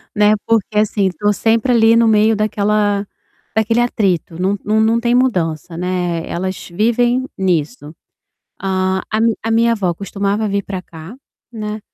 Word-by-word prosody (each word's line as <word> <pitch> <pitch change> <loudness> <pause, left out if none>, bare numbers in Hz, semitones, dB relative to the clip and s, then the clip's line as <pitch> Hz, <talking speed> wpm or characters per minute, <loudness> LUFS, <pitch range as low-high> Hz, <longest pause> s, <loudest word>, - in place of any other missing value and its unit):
né, 210 0 +4
porque 215 -2 0
assim 205 -2 +1
estou 205 +3 0
sempre 225 +4 +1
ali 225 -1 +5
no 230 0 +4
meio 215 0 +4
daquela 205 -1 0 0.5
daquele 225 +2 +1
atrito, 185 -7 -1
não 195 +2 +1
não 215 +1 +2
não 225 +1 +2
tem 240 0 0
mudança, 170 - 0
né, 180 -2 -2
elas 185 +1 -4
vivem 240 +6 +1
nisso. 170 - -2 0.7
A 190 0 -1
a 215 - 0
mi 230 -1 +3
a 225 - -2
minha 230 +1 +3
avó 185 -6 -1
costumava 200 +3 -2
vir 200 0 -1
pra 190 -2 -6
cá, 165 +6 -11 0.4
né, 215 -1 -5
210 Hz, 155 wpm, -17 LUFS, 185-225 Hz, 0.7 s, ali